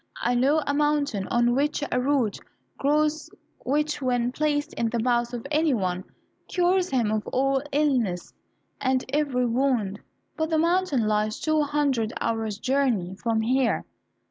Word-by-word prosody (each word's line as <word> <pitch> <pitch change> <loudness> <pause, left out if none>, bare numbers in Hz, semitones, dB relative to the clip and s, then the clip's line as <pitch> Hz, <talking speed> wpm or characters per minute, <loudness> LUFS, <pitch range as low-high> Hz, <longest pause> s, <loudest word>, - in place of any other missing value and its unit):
I - - +2
know 280 +6 +3
a 285 - 0
mountain 290 -8 0
on 240 0 +2
which 290 +3 0
a 250 - +1
root 255 -6 +1 0.4
grows 300 +2 +1 0.3
which, 295 +3 0
when 245 -2 0
placed 295 +1 -1
in 230 - -1
the 235 - -2
mouth 240 0 +1
of 240 0 -6
any 305 -2 +2
one, 185 -3 -2 0.4
cures 360 0 +1
him 240 -6 +1
of 215 -1 -2
all 270 +1 +1
illness 255 -11 0 0.5
and 260 -1 +1
every 275 -3 +1
wound. 235 -5 0 0.4
But 315 0 -1
the 320 - +1
mountain 335 -7 +2
lies 215 0 0
two 310 -1 +1
hundred 280 -6 0
hours 220 -2 -2
journey 245 -7 0
from 225 +2 -1
here." 250 +2 +1
260 Hz, 150 wpm, -25 LUFS, 230-295 Hz, 0.5 s, know